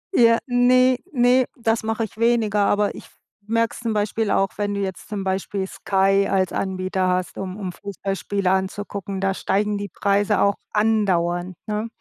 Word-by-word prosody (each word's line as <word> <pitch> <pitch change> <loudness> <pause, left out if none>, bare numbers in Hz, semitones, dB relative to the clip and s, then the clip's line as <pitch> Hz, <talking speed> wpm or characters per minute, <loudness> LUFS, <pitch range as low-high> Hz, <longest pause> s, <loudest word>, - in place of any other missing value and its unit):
Ja, 230 -4 +6
ne, 255 +1 +4
ne. 250 -1 +4
Das 225 -1 0
mache 225 +1 -1
ich 220 - -7
weniger, 230 -3 +2
aber 205 0 +1
ich - - -10
f - - -23 0.3
merke 230 +1 +1
es - - -9
zum 230 -2 -1
Beispiel 210 +1 0
auch, 195 0 +2
wenn 205 -1 -1
du - - -2
jetzt 190 0 -5
zum 205 -2 -3
Beispiel 190 +1 -2
Sky 195 +1 +1
als 190 -2 +1
Anbieter 185 0 -1
hast, 180 0 -1
um 190 0 -5
um 190 -3 -4
Fußballspiele 195 0 -3
anzugucken. 195 +1 -2
Da 195 0 +1
steigen 205 +2 0
die 205 0 -5
Preise 200 +2 +1
auch 200 - +4 0.2
andauernd, 185 -5 +1
ne. 215 +1 -2
205 Hz, 175 wpm, -22 LUFS, 190-225 Hz, 0.3 s, Ja